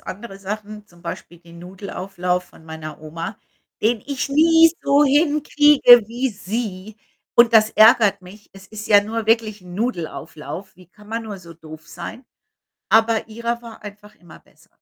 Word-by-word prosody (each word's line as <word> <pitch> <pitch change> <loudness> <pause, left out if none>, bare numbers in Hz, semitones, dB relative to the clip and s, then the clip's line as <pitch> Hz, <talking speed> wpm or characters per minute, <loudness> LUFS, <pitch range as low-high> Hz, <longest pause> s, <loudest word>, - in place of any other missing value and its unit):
andere 195 0 -9
Sachen, 210 +1 -7
zum 175 -2 -22
Beispiel 175 - -8
den 170 0 -16
Nudelauflauf 180 -1 -4
von 160 - -20
meiner 155 -2 -9
Oma, 165 +6 -7 0.4
den 220 -1 0
ich 280 -1 -3
nie 325 +3 +5
so 285 +1 +4
hinkriege 290 -4 +5
wie 245 +3 -2
sie 205 0 -6 0.4
und 235 0 +5
das 220 -1 +5
ärgert 215 -3 +5
mich, 200 +4 -15
es 195 0 -14
ist 215 +1 -9
ja 205 -1 +6
nur 220 +1 -4
wirklich 220 -2 +1
'n 180 -1 -12
Nudelauflauf. 170 - -6
Wie 180 -1 -19
kann 210 +3 -20
man 230 +2 -4
nur 215 -3 -7
so 170 -2 -13
doof 155 -1 -13
sein? 175 +9 -9 0.7
Aber 225 0 +2
ihrer 235 +2 -4
war 230 -2 -13
einfach 210 +1 -12
immer 170 -2 -17
besser. - - -27
210 Hz, 160 wpm, -20 LUFS, 180-230 Hz, 0.7 s, ja